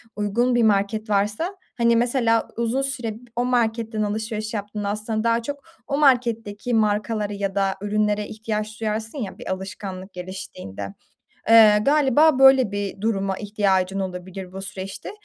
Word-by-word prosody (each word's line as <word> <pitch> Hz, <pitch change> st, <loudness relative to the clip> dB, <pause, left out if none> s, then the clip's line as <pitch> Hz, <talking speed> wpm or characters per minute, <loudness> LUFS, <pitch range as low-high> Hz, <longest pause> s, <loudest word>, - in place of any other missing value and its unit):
uygun 230 Hz, +4 st, +1 dB
bir 240 Hz, -, +3 dB
market 215 Hz, +1 st, +1 dB
varsa, 210 Hz, -, 0 dB, 0.2 s
hani, 235 Hz, -1 st, +4 dB
mesela 235 Hz, -1 st, +2 dB
uzun 235 Hz, +3 st, 0 dB
süre 260 Hz, -5 st, -2 dB
b -, -, -12 dB, 0.2 s
o 245 Hz, +1 st, 0 dB
marketten 225 Hz, -2 st, 0 dB
alışveriş 215 Hz, +1 st, -3 dB
yaptığında 205 Hz, 0 st, -3 dB
aslında 215 Hz, +1 st, -2 dB
daha 230 Hz, 0 st, +2 dB
çok 285 Hz, +3 st, -6 dB, 0.2 s
o 280 Hz, -, -1 dB
marketteki 240 Hz, -5 st, +1 dB
markalara 210 Hz, -1 st, +1 dB
ya 200 Hz, -1 st, -3 dB
da 195 Hz, -1 st, +1 dB
ürünlere 210 Hz, 0 st, 0 dB
ihtiyaç 215 Hz, 0 st, -4 dB
duyarsın 220 Hz, +4 st, -3 dB
ya 210 Hz, -8 st, -5 dB
bir -, -, -6 dB
alışkanlık 190 Hz, 0 st, -6 dB
geliştiğinde. 180 Hz, -, -7 dB, 0.6 s
Iıı, 215 Hz, -2 st, +7 dB
galiba 295 Hz, 0 st, +4 dB
böyle 265 Hz, -4 st, +6 dB
bir 200 Hz, -1 st, -4 dB
duruma 195 Hz, -3 st, -1 dB
ihtiyacın 195 Hz, -2 st, 0 dB
olabilir 185 Hz, 0 st, -6 dB
bu 190 Hz, 0 st, -7 dB
süreçte. 195 Hz, 0 st, -6 dB
215 Hz, 145 wpm, -23 LUFS, 200-235 Hz, 0.6 s, Iıı